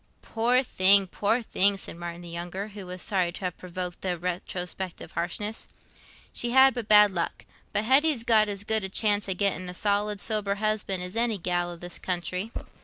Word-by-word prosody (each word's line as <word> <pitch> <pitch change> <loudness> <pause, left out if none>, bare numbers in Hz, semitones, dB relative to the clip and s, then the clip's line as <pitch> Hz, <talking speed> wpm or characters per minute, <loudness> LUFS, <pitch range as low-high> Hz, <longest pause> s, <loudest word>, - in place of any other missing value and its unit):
"Poor 245 +3 +1
thing, 195 -4 +6
poor 210 +6 -1
thing!" 200 -2 +3
said 190 - -8
Martin 170 0 -7
the 175 - -10
younger, 175 +4 -5
who 200 -2 -9
was 180 0 -6
sorry 185 -4 0
to - - -9
have 180 -2 -4
provoked 180 -1 -6
this 180 -2 -2
retrospective 180 +1 -4
harshness. 190 +6 -4 0.7
"She'd 265 +2 +4
but 240 -4 -5
bad 210 -1 +7
luck. 170 -3 -4 0.3
But 205 - 0
Hetty's 265 +1 +3
got 220 -3 +4
as 200 -1 -2
good 220 0 +1
a 190 - -4
chance 205 0 +1
o' 190 - 0
getting 185 -1 -1
a 180 - -8
solid, 205 +1 0
sober 210 -2 -1
husband 210 -3 -1
as 180 +2 -7
any 230 -2 +1
gell 175 -1 -1
i' - - -7
this 175 +1 -8
country." 180 +3 -3
195 Hz, 185 wpm, -26 LUFS, 180-215 Hz, 0.7 s, bad